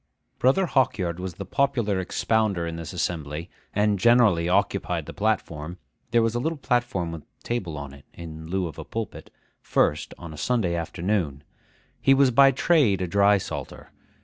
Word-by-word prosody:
Brother 135 Hz, +10 st, +3 dB
Hawkyard 95 Hz, -, 0 dB
was 90 Hz, -2 st, -5 dB
the -, -, -6 dB
popular 120 Hz, -8 st, 0 dB
expounder 100 Hz, -1 st, 0 dB
in 85 Hz, 0 st, -4 dB
this 85 Hz, -3 st, -6 dB
assembly, 80 Hz, -2 st, -3 dB, 0.2 s
and 105 Hz, -1 st, +1 dB
generally 105 Hz, -7 st, +4 dB
occupied 90 Hz, -, 0 dB
the -, -, -8 dB
platform 90 Hz, -6 st, -2 dB, 0.3 s
(there 115 Hz, 0 st, +3 dB
was 115 Hz, 0 st, +1 dB
a 120 Hz, -, -1 dB
little 160 Hz, +5 st, -2 dB
platform 120 Hz, -10 st, -1 dB
with 80 Hz, -2 st, -7 dB
a -, -, -34 dB
table 95 Hz, -10 st, -3 dB
on 70 Hz, -1 st, -7 dB
it, 70 Hz, 0 st, -15 dB
in 80 Hz, -1 st, -9 dB
lieu 95 Hz, +2 st, -1 dB
of 80 Hz, -, -7 dB
a -, -, -5 dB
pulpit) 115 Hz, -1 st, -6 dB, 0.3 s
first, 75 Hz, -, 0 dB
on 85 Hz, -2 st, -9 dB
a -, -, -10 dB
Sunday 105 Hz, 0 st, 0 dB
afternoon. 85 Hz, -3 st, -2 dB, 0.6 s
He 135 Hz, -, +5 dB
was 135 Hz, -1 st, +4 dB
by 135 Hz, +3 st, +7 dB
trade 135 Hz, -, +3 dB
a 90 Hz, -, -1 dB
drysalter. 100 Hz, +1 st, 0 dB
95 Hz, 170 wpm, -25 LUFS, 85-120 Hz, 0.6 s, by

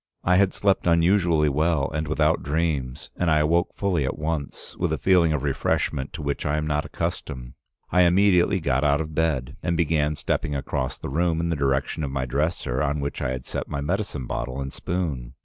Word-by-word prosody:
"I 90 Hz, +1 st, +4 dB
had 95 Hz, -1 st, +4 dB
slept 100 Hz, -3 st, +1 dB
unusually 85 Hz, -2 st, +3 dB
well 75 Hz, 0 st, +1 dB
and 80 Hz, 0 st, -2 dB
without 75 Hz, +1 st, +2 dB
dreams, 70 Hz, -3 st, -2 dB
and 90 Hz, -, +1 dB
I 80 Hz, -, +4 dB
awoke 85 Hz, +4 st, +2 dB
fully 95 Hz, -7 st, 0 dB
at 65 Hz, -, -2 dB
once, 75 Hz, -2 st, -4 dB
with 85 Hz, -3 st, -1 dB
a 80 Hz, -, 0 dB
feeling 85 Hz, +3 st, +4 dB
of 75 Hz, -3 st, -1 dB
refreshment 70 Hz, 0 st, -1 dB
to 80 Hz, -, -6 dB
which 70 Hz, -1 st, -2 dB
I 75 Hz, +1 st, 0 dB
am 75 Hz, -, -1 dB
not 75 Hz, -1 st, 0 dB
accustomed. 60 Hz, -3 st, -4 dB, 0.4 s
I 90 Hz, -, +4 dB
immediately 95 Hz, +1 st, +4 dB
got 70 Hz, -4 st, 0 dB
out 70 Hz, 0 st, +3 dB
of 80 Hz, -1 st, -4 dB
bed 75 Hz, -6 st, -1 dB
and 85 Hz, -1 st, 0 dB
began 75 Hz, -2 st, +1 dB
stepping 75 Hz, -, -1 dB
across 70 Hz, -1 st, -2 dB
the -, -, -6 dB
room 80 Hz, +3 st, +1 dB
in 85 Hz, 0 st, -1 dB
the 85 Hz, -, 0 dB
direction 70 Hz, +2 st, 0 dB
of 70 Hz, -, -2 dB
my 65 Hz, -1 st, -2 dB
dresser, 70 Hz, -1 st, -1 dB
on 75 Hz, +1 st, 0 dB
which 70 Hz, 0 st, -3 dB
I -, -, 0 dB
had 65 Hz, 0 st, -4 dB
set -, -, -4 dB
my 70 Hz, -, -3 dB
medicine 75 Hz, -3 st, -2 dB
bottle 65 Hz, +2 st, -4 dB
and 70 Hz, 0 st, -5 dB
spoon. 75 Hz, -10 st, -3 dB
75 Hz, 205 wpm, -24 LUFS, 70-85 Hz, 0.4 s, I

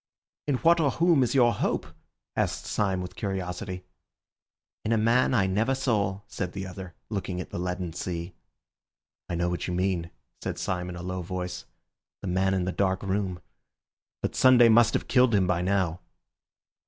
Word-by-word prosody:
"In 145 Hz, -, +2 dB
what 170 Hz, +6 st, +4 dB
or 150 Hz, -3 st, +3 dB
whom 165 Hz, -1 st, +3 dB
is 125 Hz, +1 st, +1 dB
your 120 Hz, -3 st, +5 dB
hope?" -, -, -1 dB, 0.5 s
asked -, -, -1 dB
Syme 95 Hz, -3 st, 0 dB
with 90 Hz, -, -8 dB
curiosity. 95 Hz, -1 st, -4 dB, 1.0 s
"In 110 Hz, -, -1 dB
a -, -, +3 dB
man 120 Hz, +4 st, +3 dB
I 100 Hz, -5 st, +3 dB
never 110 Hz, +8 st, +1 dB
saw," 105 Hz, -7 st, 0 dB
said 90 Hz, -3 st, -5 dB
the 95 Hz, -1 st, -4 dB
other, 90 Hz, -1 st, -8 dB, 0.2 s
looking 95 Hz, -3 st, -3 dB
at 90 Hz, -, -6 dB
the -, -, -4 dB
leaden 90 Hz, -1 st, -3 dB
sea. 85 Hz, 0 st, -4 dB, 1.0 s
"I 90 Hz, -, -1 dB
know 85 Hz, +1 st, 0 dB
what 90 Hz, 0 st, -2 dB
you 90 Hz, -, -2 dB
mean," 90 Hz, -2 st, 0 dB, 0.3 s
said -, -, -3 dB
Syme 90 Hz, -1 st, -2 dB
in 90 Hz, -, -6 dB
a 90 Hz, -, -7 dB
low 90 Hz, 0 st, -3 dB
voice, 90 Hz, 0 st, -5 dB, 0.6 s
"the -, -, -5 dB
man 95 Hz, +1 st, +1 dB
in 90 Hz, -1 st, 0 dB
the 95 Hz, -, -1 dB
dark 95 Hz, 0 st, 0 dB
room. 95 Hz, -3 st, -2 dB, 0.8 s
But -, -, -1 dB
Sunday 125 Hz, -2 st, +6 dB
must 115 Hz, 0 st, +5 dB
have -, -, -1 dB
killed 125 Hz, -3 st, +4 dB
him 95 Hz, -2 st, +3 dB
by 90 Hz, -1 st, +1 dB
now." 90 Hz, -2 st, 0 dB
95 Hz, 180 wpm, -27 LUFS, 90-110 Hz, 1.0 s, Sunday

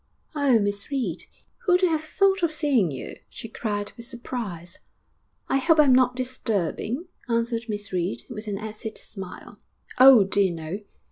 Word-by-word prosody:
'Oh, 285 Hz, -5 st, +3 dB
Miss 205 Hz, -1 st, -1 dB
Reed! 245 Hz, -, -2 dB, 0.4 s
Who'd 360 Hz, 0 st, +4 dB
have 325 Hz, -4 st, +2 dB
thought 390 Hz, +4 st, +2 dB
of 340 Hz, -2 st, +2 dB
seeing 285 Hz, -, +2 dB
you?' 135 Hz, -3 st, -7 dB
she -, -, -9 dB
cried 205 Hz, -2 st, -3 dB
with 235 Hz, -1 st, -10 dB
surprise. 225 Hz, -9 st, -6 dB, 0.7 s
'I 270 Hz, -, +2 dB
hope 325 Hz, +3 st, +3 dB
I'm 285 Hz, -4 st, +6 dB
not 250 Hz, -1 st, +4 dB
disturbing,' 250 Hz, -, -2 dB, 0.2 s
answered 230 Hz, 0 st, -1 dB
Miss 205 Hz, -2 st, -5 dB
Reed, 170 Hz, -10 st, -2 dB
with 215 Hz, +1 st, -8 dB
an 200 Hz, -1 st, -2 dB
acid 215 Hz, +1 st, -7 dB
smile. 190 Hz, -3 st, -9 dB, 0.4 s
'Oh, 255 Hz, -4 st, +9 dB
dear 195 Hz, -1 st, +2 dB
no!' 165 Hz, +4 st, -5 dB
230 Hz, 150 wpm, -25 LUFS, 200-265 Hz, 0.7 s, Oh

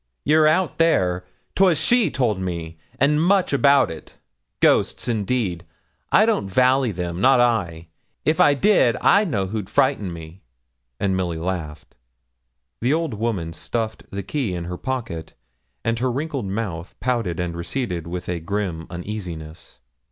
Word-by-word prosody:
'You're 155 Hz, +1 st, +5 dB
out 165 Hz, +3 st, +1 dB
there: 90 Hz, -, +2 dB, 0.3 s
'twas 185 Hz, -4 st, +4 dB
she 235 Hz, +8 st, +2 dB
told 120 Hz, -7 st, 0 dB
me; 85 Hz, -3 st, -5 dB, 0.2 s
and 150 Hz, +3 st, +3 dB
much 185 Hz, -3 st, +2 dB
about 140 Hz, -4 st, +4 dB
it. 80 Hz, -, -11 dB, 0.4 s
Ghosts, -, -, +2 dB
indeed! 105 Hz, -6 st, -1 dB, 0.5 s
I -, -, +6 dB
don't 100 Hz, -, 0 dB
vally 130 Hz, +3 st, +3 dB
them, 90 Hz, -1 st, -4 dB
not 130 Hz, 0 st, +5 dB
I; 90 Hz, -9 st, 0 dB, 0.4 s
if 155 Hz, +1 st, +2 dB
I 145 Hz, -, +5 dB
did, 160 Hz, -, +3 dB
I 205 Hz, +2 st, +4 dB
know 110 Hz, -, -1 dB
who'd 100 Hz, 0 st, -4 dB
frighten 130 Hz, -9 st, +1 dB
me,' 85 Hz, +2 st, -10 dB, 0.6 s
and 95 Hz, -2 st, +1 dB
Milly 90 Hz, -3 st, -2 dB
laughed. 80 Hz, -3 st, -5 dB, 0.9 s
The 120 Hz, +3 st, +1 dB
old 165 Hz, -5 st, -2 dB
woman 105 Hz, -7 st, -2 dB
stuffed 110 Hz, +6 st, -3 dB
the 100 Hz, 0 st, -5 dB
key 125 Hz, -9 st, -2 dB
in 85 Hz, -, -4 dB
her 90 Hz, +1 st, -5 dB
pocket, 115 Hz, -12 st, -4 dB, 0.5 s
and 115 Hz, 0 st, 0 dB
her 130 Hz, +1 st, 0 dB
wrinkled 140 Hz, -4 st, -3 dB
mouth 95 Hz, -4 st, -4 dB
pouted 115 Hz, -9 st, -1 dB
and 85 Hz, -1 st, -2 dB
receded 85 Hz, -1 st, -3 dB
with 90 Hz, +1 st, -5 dB
a 90 Hz, -1 st, -2 dB
grim 85 Hz, -2 st, -3 dB
uneasiness. 85 Hz, -3 st, -7 dB
105 Hz, 150 wpm, -22 LUFS, 85-130 Hz, 0.9 s, I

